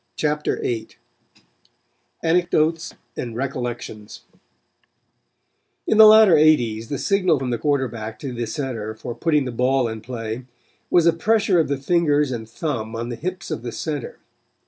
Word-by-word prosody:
CHAPTER 150 0 -1
VIII 115 -2 -3 1.3
ANECDOTES 165 -1 +1 0.2
AND 120 -2 -5
RECOLLECTIONS 120 -4 -5 1.6
In 220 - +2
the 220 - +11
latter 215 -3 +8
eighties 120 -8 +3
the 140 - -2
signal 185 -4 +2
from 130 -2 -3
the 120 - -2
quarterback 120 -7 -2
to 135 -3 -5
the 120 -1 -3
center 110 -4 -4
for 120 +2 -6
putting 150 +3 +1
the 125 - -4
ball 125 +1 +1
in 110 -1 -6
play 115 0 -6 0.4
was 175 -2 +4
a 170 - +5
pressure 205 +1 +2
of 160 - +2
the 140 - -1
fingers 150 -1 +1
and 110 -3 -5
thumb 115 -4 -4
on 115 +1 -4
the 120 - -4
hips 180 +5 -5
of - - -3
the 120 0 -5
center. 145 +1 -5
135 Hz, 150 wpm, -22 LUFS, 115-160 Hz, 1.6 s, the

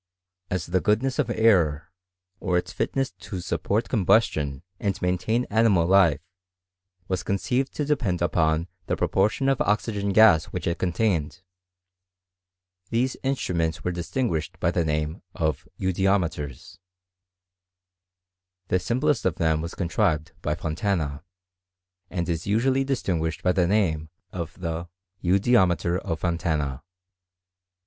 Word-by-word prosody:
As 90 -2 -2
the 90 +1 0
goodness 125 +7 +1
of 145 - +1
air, 90 -8 +2 0.5
or 90 -1 +1
ils 90 - -2
fitness 135 -4 -1
to 95 +1 -6
support 100 +5 -1
combustion, 80 - +2 0.2
and 100 -2 -1
maintain 100 +7 0
animal 105 -6 +4
life, 85 -6 +4 0.9
was 95 -1 -1
conceived 125 +7 -1
to 150 - -1
depend 130 -12 0
upon 80 -1 +1 0.2
the - - +1
proportion 105 +7 +1
of 135 -2 +2
oxygen 105 -1 0
gas 100 -6 +6
which - - -5
it 85 - -1
contained, 90 -2 0 1.5
these 125 +3 0
instruments 90 -12 -1
were 90 - 0
distiDguished 85 - -2
by - - +1
the 85 - +1
name 75 +2 -2
of 80 -3 -1
eudiometers; 90 -4 -1 1.9
the 90 - +2
sim 120 +8 -2
plest 150 -1 +2
of 90 -3 +1
them 80 -3 +1
was 85 +2 -6
contrived 85 -3 0
by 75 -3 -1
Fontana, 80 -3 -2 0.9
and 85 -3 -2
is 85 0 -2
usually 130 +6 +2
distinguished 90 -12 -1
by 90 - +3
the 90 -2 +2
name 85 -6 +1 0.2
oi 85 -2 -2
the 85 -1 -4 0.3
eudiometer 90 -2 +3
of 80 -6 -4
Fo»~ 85 - +1
laiM. 75 -5 -2
90 Hz, 125 wpm, -25 LUFS, 80-105 Hz, 1.9 s, gas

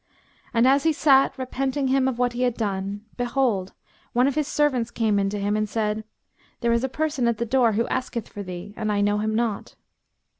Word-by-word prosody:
And 235 +1 +3
as 275 +2 +5
he 320 +1 +2
sat, 275 -3 +4
repenting 265 +1 -1
him 265 0 +3
of 260 -3 -1
what 245 0 +1
he 245 - -3
had 245 -2 +1
done, 200 -1 -3
behold 240 -6 0 0.4
one 245 +1 +4
of 280 - +1
his 300 0 -1
servants 270 -6 +1
came 220 -3 +1
in 195 0 +1
to 205 +1 -3
him 205 +1 0
and 215 0 -1
said, 215 0 -1 0.6
"There 235 -1 +2
is 235 +1 +1
a 265 - 0
person 300 -3 -1
at 235 -2 +1
the 235 - -1
door 240 -1 +3
who 230 +3 +1
asketh 240 -3 -3
for 205 - -8
thee; 185 +1 -7
and 215 -1 -2
I 205 -1 +1
know 205 0 +2
him 215 +1 -1
not." 225 -3 -2
235 Hz, 220 wpm, -24 LUFS, 210-265 Hz, 0.6 s, as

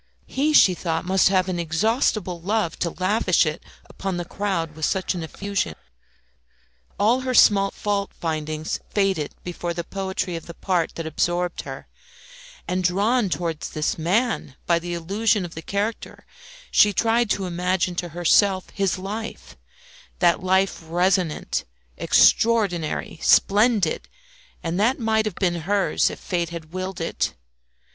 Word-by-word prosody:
He, 290 +3 0
she 195 -11 +6
thought 165 -2 -2
must 190 0 +4
have 185 -1 +2
an 185 -2 -2
inexhaustible 180 - 0
love 200 -2 -1
to 170 - 0
lavish 185 +1 +2
it 155 +1 -3 0.3
upon 195 -2 -4
the 175 - -3
crowd 175 -5 -2
with 155 0 -2
such 190 -1 0
effusion. 185 - -3 1.2
All 225 +5 +3
her 255 -1 -2
small 195 -3 +6
fault 200 -1 -2
findings 155 -1 -3
faded 195 -7 0
before 175 -1 -4
the 170 - -3
poetry 190 0 -3
of 165 - -7
the 170 - -9
part 180 -3 -1
that 165 - -5
absorbed 175 +3 -1
her; - - -8 0.8
and, 185 0 -1
drawn 205 +5 +2
towards 170 -3 -3
this 155 +1 -2
man 190 - 0
by 170 -1 +3
the 175 +1 -4
illusion 200 +4 0
of 170 - -9
the 160 - -7
character, 205 +6 -4 0.5
she 205 0 +5
tried 230 +3 +2
to 195 -2 0
imagine 180 +1 0
to 175 -1 -2
herself 185 +3 +2
his 195 -2 0
life 210 +4 -6 0.6
that 175 -2 +3
life 190 0 +1
resonant, 175 0 0 0.4
extraordinary, 185 -9 +2
splendid, 205 -4 +3 0.5
and 170 +2 -2
that 235 +6 +3
might 220 -2 +1
have 210 -5 -3
been 175 -3 0
hers 205 -1 +2
if - - -7
fate 175 -2 -2
had 165 -1 -9
willed 185 0 -4
it. 165 - -2
185 Hz, 145 wpm, -23 LUFS, 170-205 Hz, 1.2 s, she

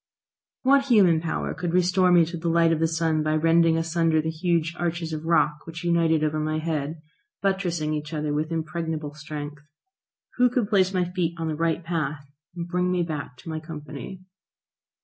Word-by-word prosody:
What 275 +1 +4
human 190 -11 +5
power 165 - -2
could 175 -2 -3
restore 180 0 +3
me 175 -2 +6
to 170 +2 -6
the 170 0 -2
light 165 0 +4
of 160 - +1
the 165 - +3
sun 160 -1 0
by 155 0 +1
rending 165 +1 +4
asunder 165 -1 +1
the 160 +1 -1
huge 165 0 0
arches 170 -1 -2
of 155 0 -5
rock 150 -3 +3
which 165 +1 -7
united 165 -2 +2
over 155 0 0
my 155 0 -1
head, 155 -1 -3 0.4
buttressing 175 -6 0
each 150 +1 -4
other 150 -2 -2
with 155 +2 -1
impregnable 160 -2 -3
strength? 150 -1 -7 0.8
Who 250 0 +5
could 245 -4 0
place 190 -2 +3
my 185 -2 +1
feet 175 -2 -2
on 165 -1 -2
the 155 - -2
right 165 +2 0
path, 155 -4 -3 0.3
and 170 -1 -4
bring 180 +1 0
me 180 -1 +1
back 150 -6 -5
to - - -9
my 160 0 -3
company? 155 +2 -8
165 Hz, 190 wpm, -25 LUFS, 155-175 Hz, 0.8 s, me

